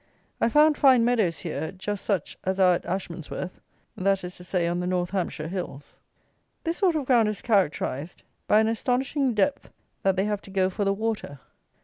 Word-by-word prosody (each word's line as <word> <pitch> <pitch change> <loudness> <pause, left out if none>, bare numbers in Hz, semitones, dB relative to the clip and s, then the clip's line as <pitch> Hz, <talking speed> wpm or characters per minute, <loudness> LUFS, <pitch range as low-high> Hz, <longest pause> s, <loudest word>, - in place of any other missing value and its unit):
I 230 - +4
found 300 +3 +4
fine 255 -4 +6
meadows 220 -9 +2
here, 160 -2 -4
just 195 +1 -5
such 195 -7 -1
as 190 +1 -1
are 185 -1 +6
at 175 - -3
Ashmansworth 180 -1 -5 0.3
(that 195 0 +1
is 180 0 -6
to 180 - -11
say, 180 -1 0
on 170 +1 0
the 180 - -2
north 180 -1 -1
Hampshire 175 -5 -2
hills.) 170 -6 -6 0.6
This 330 0 -2
sort 365 -5 +3
of 295 -3 -1
ground 235 -4 +4
is 210 - -5
characterized 175 - 0 0.2
by 215 - +5
an 220 - +2
astonishing 250 +3 0
depth 275 +7 0 0.3
that 195 -1 +2
they 190 +1 +1
have 210 -1 -1
to - - -14
go 190 -1 +1
for 205 - -2
the 195 - +3
water. 215 -9 -3
195 Hz, 195 wpm, -26 LUFS, 180-230 Hz, 0.6 s, fine